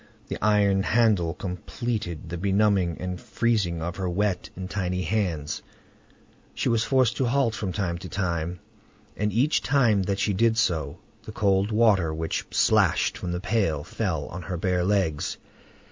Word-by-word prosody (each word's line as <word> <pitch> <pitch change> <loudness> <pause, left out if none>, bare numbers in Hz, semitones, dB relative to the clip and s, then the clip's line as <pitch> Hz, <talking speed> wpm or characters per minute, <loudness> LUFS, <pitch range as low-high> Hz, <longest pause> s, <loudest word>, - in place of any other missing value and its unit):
The - - -5
iron 100 -2 +3
handle 100 -6 +2
completed 90 -2 -4
the 85 - -4
benumbing 100 -2 +2
and 90 -1 -4
freezing 100 -8 0
of 85 +2 -4
her 95 -2 -2
wet 95 +1 -1
and 95 0 -5
tiny 90 -2 -2
hands; 85 -6 -1 0.9
she - - 0
was 115 -1 +2
forced 130 -3 +2
to 130 - +1
halt 125 -2 +2
from 100 -2 -3
time 85 -4 -2
to 90 0 -8
time, 85 -2 -2 0.5
and 105 0 -1
each 130 +9 +2
time 120 -8 +3
that 95 +1 -1
she 100 +1 +1
did 110 +3 +2
so, 80 -10 0 0.2
the - - -9
cold 100 -2 +1
water 105 -7 +3
which 80 0 -3
splashed - - +3
from 90 - -4
the 90 - -2
pail 95 -8 0
fell 80 -6 -2
on 95 - -6
her 90 -1 -4
bare 90 +1 0
legs. 95 -6 0
95 Hz, 160 wpm, -26 LUFS, 85-110 Hz, 0.9 s, iron